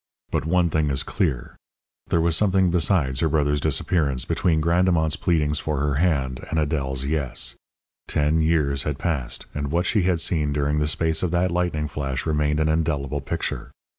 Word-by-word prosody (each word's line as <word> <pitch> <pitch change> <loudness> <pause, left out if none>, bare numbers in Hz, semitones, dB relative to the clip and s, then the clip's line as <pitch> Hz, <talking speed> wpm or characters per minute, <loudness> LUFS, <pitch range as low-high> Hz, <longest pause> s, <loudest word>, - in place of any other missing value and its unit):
But - - -1
one 85 0 +2
thing 75 -2 +1
is 70 -1 0
clear 60 - -2 0.5
there - - +1
was 85 -1 +2
something 95 -1 +3
besides 80 -6 +1
her 80 - +2
brother's 75 -1 +1
disappearance 70 -2 0
between 80 -3 +1
Grandemont's 85 -1 +2
pleadings 75 -3 +1
for 75 -1 -2
her 75 0 0
hand 70 -8 0
and 80 - -1
Adèle's 70 -4 -1
"yes." 70 -4 -2 0.5
Ten 75 +2 +1
years 75 -4 +1
had 75 -1 -3
passed, 75 -7 -2
and 70 -1 -3
what 85 +3 +1
she 105 - +2
had 90 -2 +1
seen 75 -3 0
during 75 +1 0
the 75 - +1
space 80 +1 0
of 90 - 0
that 90 +2 +1
lightning 85 -3 -1
flash 70 -3 -3
remained 75 -1 +1
an 80 - +2
indelible 75 -3 -1
picture. 70 - -4
75 Hz, 175 wpm, -23 LUFS, 70-85 Hz, 0.5 s, something